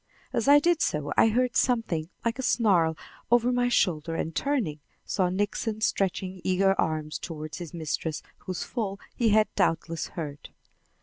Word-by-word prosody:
As 230 - 0
I 285 +1 +9
did 335 +2 +2
so 150 -1 0
I - - +6
heard 245 +2 +1
something 205 -11 +1 0.2
like 230 +3 0
a - - 0
snarl 180 -11 +3 0.3
over 240 +1 +4
my 245 0 +2
shoulder, 165 -8 +1
and, 165 0 -3
turning, 245 - 0 0.3
saw 185 -3 +1
Nixon 205 +3 -1
stretching 190 -2 -1
eager 195 +1 +3
arms 155 -1 -2
toward 155 -2 -7
his 175 -3 -7
mistress, 160 -1 -3 0.2
whose 185 -1 -4
fall 205 -5 -3 0.2
he 235 -2 +2
had 215 0 +4
doubtless 165 0 0
heard. 145 -3 -6
190 Hz, 160 wpm, -27 LUFS, 160-235 Hz, 0.3 s, I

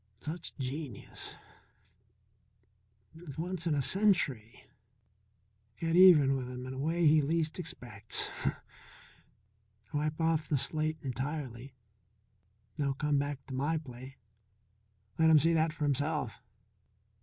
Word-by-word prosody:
"... - - -25
such 160 +3 -6
genius... 135 -3 -5 2.0
once 175 +1 -3
in 155 - +2
a 140 - +1
century... 145 - +1 1.1
get 165 0 -1
even 160 -7 +7
with 125 -2 -4
him 125 0 -7
in 130 - -6
a - - -7
way 165 +4 +1
he 155 0 +6
least 160 +3 -1
expects... 120 - -2 1.7
wipe 150 +1 -1
off 160 -1 +1
the 145 - +2
slate 155 +3 0
entirely... 130 -1 -5 1.0
no 140 -2 0
comeback 145 -1 -1
to 135 - -8
my 145 +5 0
play... 130 -3 -9 1.0
let 160 0 +5
him 160 - +8
see 165 +3 +4
that 160 0 +2
for 155 -1 -5
himself. 145 -3 -1
150 Hz, 115 wpm, -31 LUFS, 130-160 Hz, 2.0 s, him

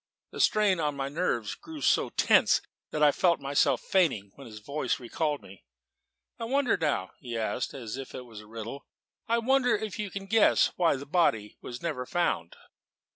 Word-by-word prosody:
The - - -8
strain 205 -4 +3
on 150 -2 0
my 135 0 -3
nerves 140 - -1
grew 315 -1 -10
so - - +2
tense - - +4 0.3
that 150 - -1
I 145 - +7
felt 170 +2 +2
myself 140 0 +2
fainting 140 - +1
when 135 -3 -12
his 110 -2 -10
voice 135 +5 -2
recalled 145 +4 -2
me. 95 0 -14 0.8
"I 230 - -3
wonder 270 0 +2
now," 95 - -1
he 120 -2 -5
asked, 110 +4 -2
as 120 -2 -6
if 135 - -8
it 125 - -7
were 110 -3 -11
a 105 - -16
riddle 115 +5 -7 0.4
"I 230 - +2
wonder 250 +1 +3
if 215 +1 -4
you 210 -1 -2
can 195 0 -6
guess 220 +2 +4
why 170 -4 +3
the 140 +1 -7
body 125 - +1
was 125 +3 -8
never 135 -7 -3
found?" 130 - -1
145 Hz, 185 wpm, -28 LUFS, 120-195 Hz, 0.8 s, I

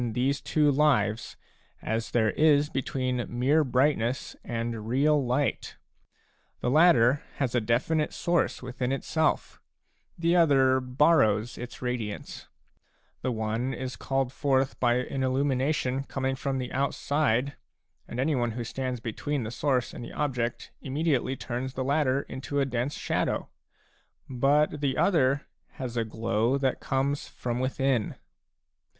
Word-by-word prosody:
these 135 +4 0
two 150 -2 +2
lives 125 -7 +1 0.4
as 110 +1 -2
there 110 -3 +2
is 150 -1 +3
between 130 -1 -1
mere 135 +6 +2
brightness 130 -2 0
and 115 -2 -4
real 140 +4 +3
light; 130 +3 -1 0.8
the 125 - -1
latter 145 -4 +5
has 130 -4 -1
a 120 - +2
definite 130 +8 +1
source 175 -6 0
within 125 0 -3
itself, 155 +3 -1 0.6
the 170 +1 +2
other 135 -6 +4
borrows 125 -4 +2
its 125 +1 -8
radiance; 120 -4 -4 0.7
the 130 - -1
one 115 +3 -2
is 130 +1 -5
called 135 -1 -1
forth 135 -2 +1
by 120 -1 +3
an 125 +2 -2
illumination 130 0 0
coming 135 -1 -2
from 135 0 -2
the 125 -1 -4
outside, 140 -1 0 0.5
and 120 - -6
anyone 130 -5 +1
who 120 +1 -4
stands 130 +1 -3
between 125 +5 -3
the 110 - -5
source 125 0 0
and - - -7
the - - -9
object 125 -5 -2
immediately 135 -2 0
turns 130 +1 -5
the 130 - -1
latter 140 -1 +1
into 140 +2 -4
a 140 - +2
dense 125 +2 -2
shadow; - - -1 0.8
but 145 +3 +2
the 135 -2 0
other 145 -5 +2 0.3
has 130 -4 -6
a 115 - +1
glow 115 +3 0
that 135 -2 0
comes 140 +2 -1
from 120 -1 -4
within. 130 -2 0
130 Hz, 135 wpm, -27 LUFS, 120-140 Hz, 0.8 s, latter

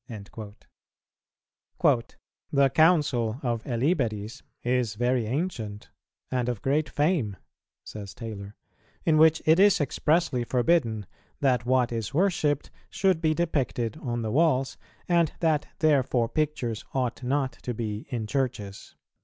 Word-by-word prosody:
"[410:4] 115 -2 +2 0.4
"The 140 -1 +4
Council 140 -7 +3
of 120 -2 -1
Eliberis 120 - -1 0.2
is 120 -3 0
very 120 0 +1
ancient, 115 - -4 0.4
and 125 -1 0
of 120 -5 -4
great 145 +3 +1
fame," 145 - 0 0.5
says 100 -2 -9
Taylor, 105 -3 -7 0.5
"in 155 -2 +4
which 160 0 +5
it 160 +3 +5
is 200 0 +6
expressly 150 -3 +1
forbidden 120 - +1 0.3
that 125 -4 +1
what 125 -1 +2
is 115 +2 -4
worshipped 155 -5 +1 0.2
should 190 -4 +1
be 155 -1 +2
depicted 140 -8 -1
on 120 -5 -3
the 110 - -2
walls, 135 -2 +2 0.3
and 170 -3 +2
that 155 -3 +1
therefore 135 -6 +2
pictures 130 -6 -2
ought 125 -2 -1
not 135 +1 0
to 125 - -4
be 110 -1 -4
in 115 -3 -3
churches." 105 -5 -3
130 Hz, 125 wpm, -27 LUFS, 115-155 Hz, 0.5 s, is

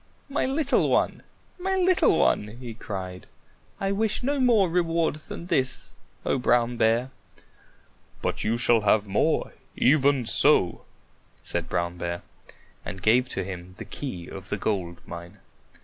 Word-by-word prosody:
"My 275 -1 0
little 275 +1 +2
one! - - +1 0.4
My 380 +1 -1
little 370 - +3
one!" 105 -6 +1
he 120 -3 -7
cried. 95 -4 -7 0.5
"I 195 0 -1
wish 215 +3 -1
no 280 +2 0
more 235 -7 +4
reward 165 -2 0
than 170 - -7
this, 135 -7 +1 0.3
O - - +1
Brown 120 -1 +2
Bear." 115 +4 +2 1.1
"But - - -2
you 115 +2 0
shall 120 -2 +3
have 105 0 +3
more, 95 - 0 0.2
even 140 -2 +3
so," - - +5 0.6
said 85 -1 -3
Brown 85 0 -2
Bear, 85 0 -4 0.6
and 95 - -7
gave 125 +4 +3
to 95 - -2
him 90 -1 -8
the - - -8
key 90 -12 -6
of - - -9
the - - -2
gold 90 -5 -3
mine. 85 +1 -9
120 Hz, 145 wpm, -25 LUFS, -, 1.1 s, so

